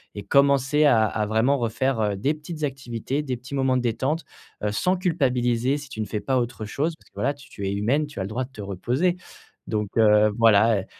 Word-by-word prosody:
et 105 Hz, -, -5 dB
commencer 140 Hz, +5 st, +3 dB
à 115 Hz, -6 st, +5 dB
à 105 Hz, +1 st, -1 dB
vraiment 110 Hz, +6 st, +2 dB
refaire, 120 Hz, +1 st, -1 dB
heu, 105 Hz, -2 st, 0 dB
des 135 Hz, +11 st, 0 dB
petites 155 Hz, +1 st, -8 dB
activités, 135 Hz, 0 st, -3 dB
des 130 Hz, -4 st, -3 dB
petits 130 Hz, +3 st, -8 dB
moments 135 Hz, -1 st, +2 dB
de -, -, 0 dB
détente, 130 Hz, +7 st, -1 dB, 0.4 s
heu, 105 Hz, -, 0 dB
sans 180 Hz, -, +1 dB
culpabiliser 130 Hz, -, +1 dB
si 145 Hz, -2 st, -9 dB
tu 110 Hz, -, -9 dB
ne 110 Hz, -, -1 dB
fais 105 Hz, -, -3 dB
pas 130 Hz, -1 st, 0 dB
autre 120 Hz, -2 st, -3 dB
chose. 150 Hz, +10 st, -2 dB
Parce -, -, -26 dB
que -, -, -45 dB
voilà, 140 Hz, +3 st, 0 dB
tu 145 Hz, 0 st, -17 dB
tu 100 Hz, -1 st, -5 dB
es 100 Hz, -, -1 dB
humaine, 125 Hz, +10 st, +1 dB
tu 145 Hz, -, -9 dB
as 95 Hz, -, -1 dB
le -, -, -4 dB
droit 125 Hz, +4 st, -2 dB
de 135 Hz, -, -20 dB
te 110 Hz, -6 st, -9 dB
reposer. 125 Hz, -, -1 dB, 0.5 s
Donc, 105 Hz, -2 st, -1 dB
heu, 105 Hz, -1 st, +5 dB
voilà, 110 Hz, -2 st, +5 dB
heu, -, -, -11 dB
125 Hz, 235 wpm, -24 LUFS, 110-140 Hz, 0.5 s, à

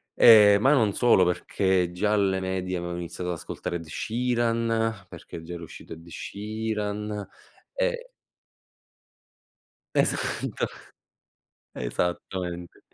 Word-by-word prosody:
ehm, 105 Hz, -3 st, +8 dB
ma 135 Hz, +5 st, +5 dB
non 110 Hz, -8 st, +3 dB
solo 115 Hz, -7 st, +5 dB
perché 90 Hz, 0 st, +1 dB
già 105 Hz, +4 st, 0 dB
alle 100 Hz, -2 st, +2 dB
medie 95 Hz, -1 st, -2 dB
avevo 85 Hz, 0 st, -4 dB
iniziato 90 Hz, +1 st, -5 dB
ad -, -, -2 dB
ascoltare 85 Hz, -, -5 dB
Ed 85 Hz, -1 st, -5 dB
Sheeran, 115 Hz, +1 st, 0 dB
perché 80 Hz, -, -10 dB
già 85 Hz, +1 st, -7 dB
era 85 Hz, -, -7 dB
uscito 80 Hz, -, -10 dB
Ed 80 Hz, +1 st, -13 dB
Sheeran 105 Hz, +2 st, -4 dB, 0.5 s
e -, -, -1 dB, 1.9 s
Esatto. 135 Hz, -5 st, 0 dB, 1.1 s
Esattamente. 90 Hz, +6 st, -3 dB
100 Hz, 105 wpm, -26 LUFS, 90-110 Hz, 1.9 s, ehm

